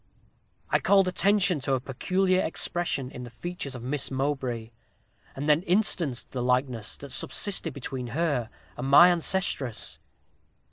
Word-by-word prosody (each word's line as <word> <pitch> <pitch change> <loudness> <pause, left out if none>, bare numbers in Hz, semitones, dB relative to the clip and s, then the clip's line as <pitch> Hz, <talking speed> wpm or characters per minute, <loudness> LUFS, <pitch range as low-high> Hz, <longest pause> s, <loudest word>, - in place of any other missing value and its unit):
I - - +4
called 195 -2 +4
attention 190 -1 +2
to 135 0 0
a - - -1
peculiar 185 +9 0
expression 160 -5 -1
in 125 - -8
the 120 - -8
features 160 -1 -6
of 120 - -8
Miss 140 +2 0
Mowbray, 130 -4 -2 0.6
and 140 +2 -4
then 150 +1 +4
instanced 175 - +1
the 125 - -3
likeness 125 -3 -1
that 140 -1 -10
subsisted 180 0 0
between 130 -2 -5
her 145 -9 0 0.3
and 130 - -4
my 160 +6 +8
ancestress. 170 - -1
140 Hz, 140 wpm, -27 LUFS, 125-180 Hz, 0.6 s, my